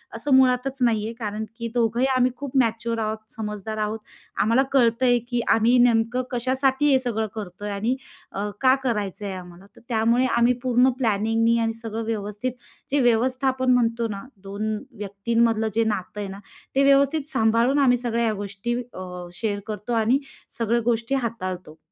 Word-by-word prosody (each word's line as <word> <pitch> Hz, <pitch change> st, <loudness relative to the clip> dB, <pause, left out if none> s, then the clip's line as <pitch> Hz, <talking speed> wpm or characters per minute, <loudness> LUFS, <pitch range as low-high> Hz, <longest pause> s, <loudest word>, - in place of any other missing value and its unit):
असं 265 Hz, +4 st, +2 dB
मुळातच 260 Hz, +1 st, +3 dB
नाही 225 Hz, -4 st, +2 dB
आहे. 225 Hz, -, -4 dB
कारण 215 Hz, -1 st, -3 dB
की 230 Hz, -, -3 dB
दोघंही 235 Hz, +1 st, +2 dB
आम्ही 255 Hz, 0 st, +3 dB
खूप 275 Hz, 0 st, -4 dB
मॅच्युअर 230 Hz, -1 st, +1 dB
आहोत, 215 Hz, 0 st, -1 dB, 0.2 s
समजदार 210 Hz, 0 st, -5 dB
आहोत, 215 Hz, +1 st, -2 dB, 0.4 s
आम्हाला 230 Hz, +6 st, +3 dB
कळतंय, 245 Hz, -1 st, +4 dB
की 240 Hz, -2 st, 0 dB
आम्ही 230 Hz, +3 st, +4 dB
नेमकं 240 Hz, +1 st, +3 dB
कशासाठी 265 Hz, +3 st, +1 dB
हे 265 Hz, -, +6 dB
सगळं 225 Hz, -4 st, -2 dB
करतोय? 205 Hz, -1 st, -6 dB
आणि 215 Hz, +6 st, 0 dB, 0.4 s
अ, 205 Hz, +2 st, -3 dB
का 260 Hz, 0 st, +6 dB
करायचं 210 Hz, -5 st, -2 dB
आहे 195 Hz, -, -3 dB
आम्हाला? 180 Hz, 0 st, -11 dB
तर -, -, -15 dB
त्यामुळे 235 Hz, +2 st, +2 dB
आम्ही 235 Hz, +1 st, +4 dB
पूर्ण 250 Hz, 0 st, +4 dB
प्लॅनिंगनी 225 Hz, +2 st, +2 dB
आणि 225 Hz, -, -1 dB
सगळं 225 Hz, 0 st, -4 dB
व्यवस्थित 215 Hz, +2 st, -3 dB, 0.4 s
जे 285 Hz, -, +3 dB
व्यवस्थापन 255 Hz, +2 st, +1 dB
म्हणतो 235 Hz, -1 st, +1 dB
ना 195 Hz, -, -8 dB, 0.2 s
2 215 Hz, +2 st, -2 dB, 0.3 s
व्यक्तींमधलं 220 Hz, +2 st, +1 dB
जे -, -, +5 dB
नातं 195 Hz, +1 st, -6 dB
आहे 200 Hz, -, -4 dB
ना 195 Hz, +1 st, -8 dB, 0.4 s
ते 275 Hz, -, +4 dB
व्यवस्थित 280 Hz, +3 st, +2 dB
सांभाळून 230 Hz, +5 st, +3 dB
आम्ही 250 Hz, -3 st, +4 dB
सगळ्या 235 Hz, -1 st, -1 dB
ह्या 225 Hz, -2 st, +1 dB
गोष्टी 205 Hz, +4 st, -4 dB, 0.2 s
अ, 180 Hz, -1 st, -7 dB
शेअर 205 Hz, +2 st, -2 dB
करतो 210 Hz, +2 st, -4 dB
.आणि 230 Hz, +4 st, +3 dB, 0.4 s
सगळ्या 235 Hz, +1 st, +1 dB
गोष्टी 235 Hz, +2 st, 0 dB
हाताळतो. 185 Hz, -10 st, -4 dB
230 Hz, 165 wpm, -24 LUFS, 210-250 Hz, 0.4 s, हे